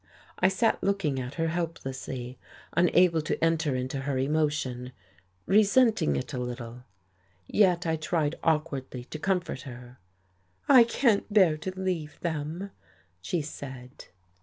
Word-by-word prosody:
I 185 - +5
sat 190 +4 +1
looking 190 -9 0
at 125 +1 -6
her 165 -1 0
helplessly, 135 -7 -5 0.3
unable 175 -1 +4
to 150 - -2
enter 165 -4 +2
into 130 +2 -3
her 135 0 -2
emotion, 135 -3 -1 0.5
resenting 210 - +4
it 70 - -4
a 125 - -2
little. 125 0 -6 0.6
Yet 180 - +3
I 160 -1 0
tried 155 -1 0
awkwardly 145 -6 -1
to 155 +5 -8
comfort 180 -6 -1
her. 125 -1 -11 0.7
"I 255 -4 +8
can't 230 -3 +1
bear 190 -7 +5
to 185 +4 -6
leave 175 -6 -3
them," 165 +4 -3 0.5
she 165 - -2
said. 130 -3 -9
155 Hz, 130 wpm, -28 LUFS, 130-180 Hz, 0.7 s, I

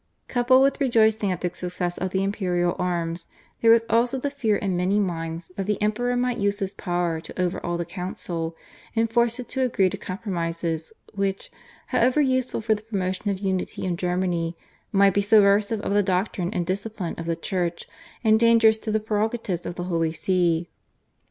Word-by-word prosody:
Coupled 255 +2 +4
with 275 +2 +1
rejoicing 220 -5 +3
at 180 - -3
the 180 -1 -2
success 180 0 -3
of 185 - -1
the 190 +1 0
imperial 180 -3 0
arms 170 -1 -2 0.3
there 230 - +5
was 230 0 +6
also 235 +4 +2
the 280 +2 -2
fear 230 -7 +1
in 195 -3 -1
many 185 +4 +2
minds 165 -3 -3
that 195 0 -3
the 210 -2 0
Emperor 230 +4 0
might 245 0 0
use 200 0 +1
his 195 -1 -3
power 175 -2 -1
to 165 - -10
overawe 175 -1 -1
the 170 - -2
Council, 170 -2 -4 0.4
and 225 0 +1
force 235 +1 +2
it 250 - -6
to 265 - -2
agree 200 -7 +2
to - - -4
compromises, 170 -4 -3 0.2
which, 195 -1 -2 0.4
however 250 +5 +3
useful 260 -4 +1
for 220 0 +2
the 210 - -4
promotion 200 -2 -2
of 195 - 0
unity 190 -1 -2
in 180 -2 0
Germany, 175 -1 -1 0.3
might 200 -1 +5
be 200 - +2
subversive 205 +1 +4
of 200 - -2
the 205 - +4
doctrine 185 -1 -1
and 180 -5 -1
discipline 195 -1 -3
of 165 - -5
the 165 - 0
Church 175 -1 -2 0.4
and 220 -1 +5
dangerous 230 -1 +5
to 220 0 -4
the 215 - +2
prerogatives 215 -3 -2
of 175 - -5
the 175 - -4
Holy 165 -3 0
See. 175 -2 +1
195 Hz, 185 wpm, -24 LUFS, 175-220 Hz, 0.4 s, was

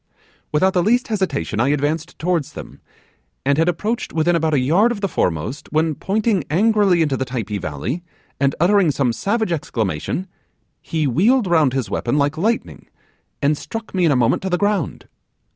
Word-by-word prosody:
'Without 185 +5 +2
the 180 - +2
least 240 +7 +2
hesitation 185 - -1
I 120 - +3
advanced 150 +4 -1
towards 170 -4 -1
them, - - -10 0.6
and 140 +2 +2
had 165 +2 +3
approached 210 +7 -2
within 165 +2 +2
about 160 -2 +1
a - - +3
yard 175 - +3
of 230 - -3
the 200 - 0
foremost, 90 - -2
when, 155 +1 +1
pointing 205 +2 0
angrily 195 0 +3
into 145 -3 0
the 130 - -1
Typee 115 -5 -4
valley, 80 - -4 0.4
and 140 -1 +1
uttering 185 +1 +4
some 135 -4 +1
savage 220 - -1
exclamation, 115 - -2 0.6
he 160 -2 -2
wheeled 210 - +3
round 160 -7 +3
his 130 -4 -2
weapon 120 +4 0
like 145 +1 +1
lightning, 220 +8 -2 0.6
and 145 +2 +3
struck 220 +11 -7
me 185 -2 +1
in 165 - +4
a - - +3
moment 125 -1 +2
to 190 - -3
the 180 - +1
ground. 205 -5 -1
160 Hz, 175 wpm, -20 LUFS, 140-195 Hz, 0.6 s, uttering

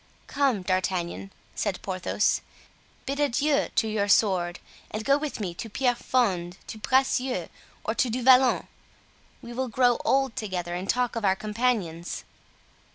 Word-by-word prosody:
"Come, 270 -9 +1
D'Artagnan," 185 0 -1 0.2
said 200 -4 -2
Porthos, 190 +2 0 0.6
"bid 280 +1 -3
adieu 285 +1 +2
to 220 - +2
your 210 -2 0
sword 185 -4 +2 0.3
and 215 +1 -5
go 280 - +5
with 290 -3 -3
me 185 -5 -3
to 225 +6 -7
Pierrefonds, 220 -7 0
to 220 - -8
Bracieux, 260 +2 +1 0.3
or - - -1
to 255 - +1
Du 245 +2 -2
Vallon. 260 0 +5 0.8
We 240 0 -8
will 260 +2 -2
grow 245 +1 +2
old 270 -3 +2
together 180 -5 -3
and 180 +2 -4
talk 245 -1 +1
of 230 - -3
our 190 -1 +3
companions." 210 -6 -2
220 Hz, 145 wpm, -26 LUFS, 190-255 Hz, 0.8 s, go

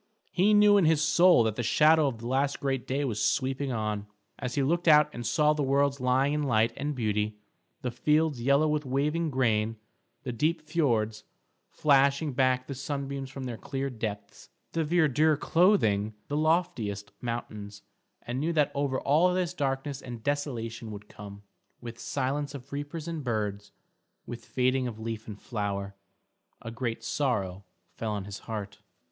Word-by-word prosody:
He 205 +4 +4
knew 205 0 +6
in 195 - +4
his 155 -1 +4
soul 165 -2 +5
that 110 -1 0
the - - -2
shadow 155 +5 +4
of 125 -4 -3
the 115 +1 -7
last 135 +2 0
great 135 -2 -2
day 140 +2 0
was 110 -5 -2
sweeping 135 +1 0
on; 105 -3 -2 0.3
as 125 -2 -4
he 140 - +2
looked 170 +5 0
out 150 -1 +6
and 120 -1 -4
saw 150 -1 +3
the 150 - -2
worlds 140 0 +1
lying 130 +3 +2
in 150 - 0
light 115 -4 +2
and 145 +1 -3
beauty, 105 -2 -1 0.5
the 125 - -1
fields 150 +1 +1
yellow 140 +5 +3
with 150 0 0
waving 150 +5 0
grain, 115 -4 +1 0.5
the 125 - -3
deep 155 +7 0
fiords 115 -9 0 0.5
flashing 140 0 +3
back 130 -1 +2
the 140 - -5
sunbeams 140 0 -4
from 135 0 -7
their 120 -3 -5
clear 135 0 -3
depths, 105 -3 -6 0.2
the 165 - 0
verdure 155 -2 +3
clothing 110 - +3
the 145 - -1
loftiest 150 - 0
mountains, 105 -4 -5 0.4
and 120 +2 -3
knew 160 +4 0
that 150 -3 +2
over 140 -2 -1
all 160 +6 +3
this 180 -4 -1
darkness 135 0 -2
and 120 -3 -8
desolation 120 -6 -3
would 105 0 -9
come, 100 0 -11 0.4
with 120 -1 -9
silence 140 +3 -2
of 140 +1 -10
reapers 145 +3 -5
and 165 -3 -4
birds, 105 -4 -3 0.5
with 120 -2 -8
fading 130 +3 +1
of 110 -2 -7
leaf 110 0 -5
and 105 -2 -8
flower, 100 -4 -3 0.7
a 115 - -7
great 115 -1 -4
sorrow 100 -9 -1 0.3
fell 110 -2 -3
on 100 -2 -4
his 100 0 -7
heart. 105 -2 -5
130 Hz, 170 wpm, -28 LUFS, 110-150 Hz, 0.7 s, knew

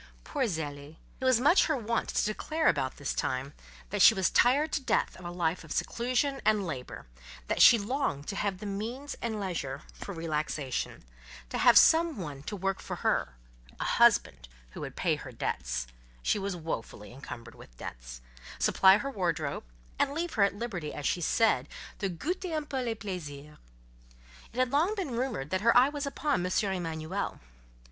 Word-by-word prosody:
Poor 280 -4 -1
Zélie! 150 -5 -4 0.2
It 260 - -3
was 255 -3 +5
much 295 +9 +5
her 310 -3 +1
wont 230 0 -1
to - - +1
declare 310 +9 -1
about 130 - +1
this 145 - -2
time, 130 +2 -2 0.4
that 205 -1 0
she 220 - +9
was 190 -2 +1
tired 285 +6 +4
to - - 0
death - - 0
of 180 - -12
a - - -3
life 175 0 -1
of - - -12
seclusion 255 +3 0
and 215 -2 +2
labour; 130 -7 -6 0.4
that - - 0
she 235 - +9
longed 210 - -2
to 200 - -3
have 200 -2 -1
the 210 - -8
means 230 +8 -4
and 220 -2 -2
leisure 155 -8 -4
for - - -8
relaxation; 155 -5 -3 0.5
to - - -3
have - - +7
some 325 -3 +6
one 150 -7 -6
to 205 - -5
work 195 0 -1
for - - -5
her—a - - -3
husband - - +3 0.2
who - - -9
would - - -6
pay - - +1
her - - -9
debts 60 0 -3 0.4
(she 205 - +1
was 195 -1 -3
woefully 155 -10 -6
encumbered 120 -3 -9
with - - -16
debt), - - -8 0.4
supply 190 +1 +5
her 275 +6 -4
wardrobe, 170 - -2 0.3
and 280 0 +1
leave 340 +1 -2
her 215 - 0
at 200 0 +3
liberty, 195 -9 -4
as 145 - -5
she 175 - +1
said, 220 +7 +2 0.3
to 195 - -1
"goûter 345 - -3
un 305 - -3
peu 280 -2 -4
les 235 -2 -2
plaisirs." 150 -8 -7 0.9
It - - -13
had 255 -1 +2
long 330 +9 +2
been 375 -10 -3
rumoured, 235 - -2
that 185 0 0
her 230 +2 +5
eye 255 +3 +6
was 290 -1 -4
upon 280 -7 0
M. 180 - -2 0.2
Emanuel. 165 +1 -3
195 Hz, 185 wpm, -30 LUFS, 150-255 Hz, 0.9 s, she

